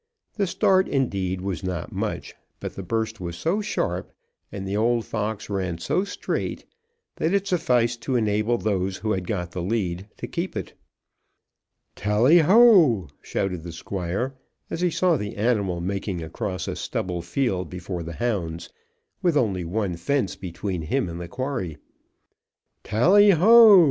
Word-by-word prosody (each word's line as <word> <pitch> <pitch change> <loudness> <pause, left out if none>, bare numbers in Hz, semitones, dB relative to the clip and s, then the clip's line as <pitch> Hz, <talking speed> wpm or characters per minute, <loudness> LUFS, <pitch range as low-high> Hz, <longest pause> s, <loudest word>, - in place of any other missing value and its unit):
The 200 -3 0
start, 190 +2 +3
indeed, 95 -9 -1
was 95 -2 -3
not 90 -3 -4
much, - - -4 0.3
but - - -5
the - - -6
burst 110 +2 -2
was 85 -1 -4
so 185 +6 0
sharp, 90 - -2 0.4
and 95 -1 -5
the 100 - -2
old 115 +2 +2
fox 105 -1 -3
ran 95 -4 -2
so 185 - 0
straight, 200 - -3 0.5
that 165 +5 +1
it 200 0 +1
sufficed 120 -10 +1
to 130 - -1
enable 110 +1 +1
those 95 -3 -1
who 110 +1 -2
had 95 -3 -2
got 90 -5 -3
the 90 - -4
lead 95 -2 -2
to - - -5
keep - - -4
it. - - -5 1.2
"Tally 115 +11 +4
ho!" 170 - +6
shouted 90 -4 -2
the 85 +1 -7
Squire, 95 +8 -3 0.4
as 165 - -3
he 180 - +3
saw 175 0 +2
the 105 -3 -5
animal 100 -5 0
making 95 -1 -3
across 90 +2 -4
a - - -3
stubble 90 -2 -3
field 90 - -1
before 90 0 -5
the 85 0 -6
hounds, 85 -7 -2 0.5
with 170 -4 +2
only 100 -8 +1
one 95 +1 -2
fence 120 +5 0
between 90 0 -4
him 105 - -1
and 85 +1 -6
the 85 - -6
quarry. 125 - -4 1.1
"Tally 195 - +5
ho!" 210 +3 +8
105 Hz, 155 wpm, -24 LUFS, 90-135 Hz, 1.2 s, ho